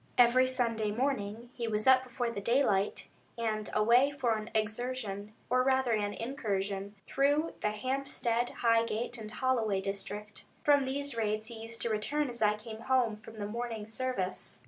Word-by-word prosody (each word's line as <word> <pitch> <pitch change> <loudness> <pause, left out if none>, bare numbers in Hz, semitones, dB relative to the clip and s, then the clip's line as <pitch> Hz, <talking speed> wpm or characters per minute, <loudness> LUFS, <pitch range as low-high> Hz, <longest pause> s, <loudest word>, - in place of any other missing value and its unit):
Every 250 +1 +6
Sunday 230 -4 0
morning 230 -1 -2
he 235 -2 -3
was 215 -1 0
up 260 0 +7
before 245 -1 -2
the 200 - -4
daylight, 210 -4 +2 0.3
and 215 -2 -1
away 235 +6 +5
for 260 -6 0
an 215 +1 -5
excursion, 215 -2 -2
or 255 +1 +3
rather 260 -1 +2
an 205 -2 0
incursion, 200 -5 -3
through 290 +4 +2
the 210 - +2
Hampstead, 245 +1 -1
Highgate, 230 +1 +1
and 215 -1 -7
Holloway 225 -4 +1
district. 200 +2 -5 0.2
From 285 -2 +5
these 280 0 -1
raids 215 0 -1
he 225 -2 -8
used 230 +1 -4
to 235 - 0
return 280 +7 0
as 240 -1 -3
I 210 -1 +4
came 220 0 -9
home 250 -3 +2
from 220 +1 -13
the 205 - -3
morning 225 0 -4
service. 220 - -3
230 Hz, 165 wpm, -31 LUFS, 210-255 Hz, 0.3 s, up